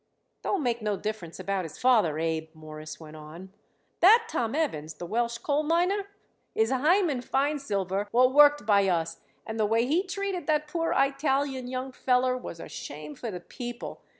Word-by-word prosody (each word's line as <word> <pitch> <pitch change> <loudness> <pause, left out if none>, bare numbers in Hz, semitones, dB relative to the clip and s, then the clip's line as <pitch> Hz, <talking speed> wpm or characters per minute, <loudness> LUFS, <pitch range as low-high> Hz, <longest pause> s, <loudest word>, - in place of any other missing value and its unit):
"Don't 385 -7 -1
make 240 -2 0
no 210 -2 -1
difference 210 -6 -5
about 195 -1 -1
his 160 -2 -8
father, 220 -12 +3
Abe," 160 0 -2
Morris 155 0 -9
went 155 -1 -11
on. 165 +5 -11 0.5
"That 450 +6 +7
Tom 240 - -2
Evans, 160 - -2
the 175 - -7
Welsh 235 +5 -1
coal 290 +4 0
miner, 355 +6 +1 0.5
is 445 +1 +2
Hyman 300 +1 +2
Feinsilver 210 -9 -1
what 250 +3 +4
worked 290 -4 +6
by 200 -2 +4
us, 165 -2 -1 0.3
and 220 0 -5
the 215 - +3
way 225 +2 +2
he 310 +8 +2
treated 380 -3 -4
that 300 -1 +2
poor 330 +1 -1
Eyetalian 275 -1 +1
young 255 +1 -4
feller 255 0 +1
was 245 -9 -7
a - - -8
shame 150 +1 -8
for 230 - -6
the 180 -4 -6
people. 240 +5 -7
245 Hz, 175 wpm, -27 LUFS, 180-295 Hz, 0.5 s, That